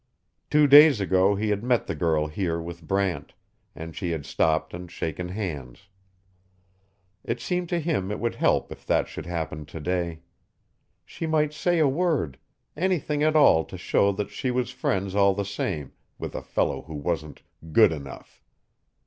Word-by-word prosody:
Two 150 0 +5
days 145 -2 +8
ago 95 +1 +3
he 105 +2 -1
had 105 +1 -1
met 125 -1 +1
the - - -3
girl 80 -3 +1
here 85 +2 -2
with 85 -1 -8
Brant, 95 -2 -1 0.4
and 80 0 -8
she 90 - -3
had 80 -4 -3
stopped 80 0 0
and 90 +1 -7
shaken 85 +2 -4
hands. 90 - -6 1.3
It - - -3
seemed 180 -1 -2
to 175 - 0
him 150 - -1
it 105 - -3
would 115 0 -1
help - - +1
if - - -10
that - - +2
should - - -8
happen 80 -3 -4
today. 80 +2 -3 0.8
She 165 - -5
might 150 -1 +1
say 175 +3 +1
a 155 -3 +4
word; 135 - 0 0.4
anything 155 -3 0
at 155 +1 +2
all 80 - +6
to - - -9
show 100 - +2
that 100 +1 -4
she 130 +5 -3
was 125 -2 -1
friends 95 0 -2
all 100 -1 +4
the 100 0 -2
same 90 -7 -3 0.3
with - - -6
a - - -4
fellow 65 - -1
who 80 0 -9
wasn't 75 0 -4 0.3
good 110 +3 +6
enough. 70 -5 -9
95 Hz, 170 wpm, -25 LUFS, 80-130 Hz, 1.3 s, days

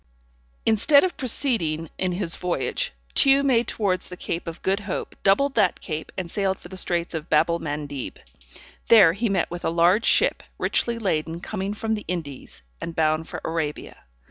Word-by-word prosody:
Instead 230 +7 +5
of 370 - -1
proceeding 215 - -1
in 185 -1 +1
his 175 -2 -2
voyage, 180 -1 -2 0.2
Tew 275 0 +5
made 245 -4 +2
towards 185 -4 0
the 180 - -8
Cape 170 0 -4
of 165 0 -7
Good 195 +2 +1
Hope, 200 -2 -5
doubled 265 +9 +3
that 205 -7 +2
cape, 155 0 -5
and 180 -3 -4
sailed 195 -2 0
for 175 - -13
the 190 - -8
straits 175 -2 0
of 160 0 -5
Babel 170 0 +3
Mandeb. 145 -3 -5 0.7
There 195 -8 +7
he 220 +4 -1
met 190 -4 0
with 175 0 -6
a - - +1
large 175 +6 +3
ship - - +3 0.2
richly 235 -1 0
laden 165 -6 -1
coming 200 +2 -4
from 220 +1 -2
the 210 - -4
Indies, 145 - -6 0.2
and 165 - -5
bound 155 0 +1
for - - -6
Arabia. 160 -2 -3
180 Hz, 175 wpm, -24 LUFS, 165-215 Hz, 0.7 s, There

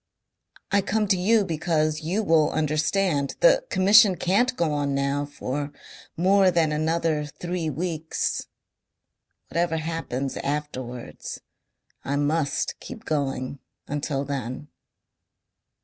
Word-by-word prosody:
I 200 - +4
come 210 +2 0
to 195 - +5
you 205 +3 +3
because 155 -2 0
you 185 +8 -1
will 160 -5 +4
understand. 155 0 0
The - - +6
Commission 200 +1 +6
can't 205 +10 +2
go 160 -3 +1
on 145 -1 0
now 140 +1 0
for 145 0 -4 0.5
more 190 +2 +5
than 165 -3 +2
another 155 0 0
three 175 +1 -3
weeks. 160 +1 -2 1.0
Whatever 170 -1 0
happens 155 -5 -3
afterwards 130 -4 -5 0.6
I 140 - -1
must 145 +1 0
keep 245 -4 -10
going 140 -3 -2 0.3
until 145 -1 -2
then." 135 +1 -5
155 Hz, 110 wpm, -25 LUFS, 145-180 Hz, 1.0 s, The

